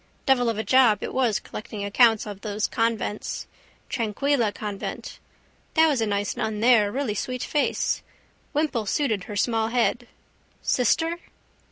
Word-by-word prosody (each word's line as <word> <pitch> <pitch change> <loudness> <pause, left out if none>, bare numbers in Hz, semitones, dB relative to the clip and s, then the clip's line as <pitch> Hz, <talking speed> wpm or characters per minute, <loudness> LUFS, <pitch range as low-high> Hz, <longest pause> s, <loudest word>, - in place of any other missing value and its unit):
Devil 245 -3 +3
of 225 - -2
a 220 - -1
job 255 -5 +4
it - - -4
was 245 -5 +2
collecting 210 -1 -7
accounts 225 +1 +4
of 205 -2 -8
those 210 -1 -2
convents. 225 -2 -2 0.4
Tranquilla 235 +1 0
convent. 205 -1 -6 0.6
That 320 0 +6
was 275 -6 +1
a 220 - +1
nice 200 -1 -1
nun 220 -2 -2
there, 220 -3 +4
really 265 -3 -1
sweet 250 +4 -3
face. 295 - 0 0.5
Wimple 285 -8 -1
suited 220 -7 0
her 210 - -7
small 225 +1 +1
head. 240 +1 0 0.6
Sister? 325 +7 +1
230 Hz, 145 wpm, -25 LUFS, 210-255 Hz, 0.6 s, That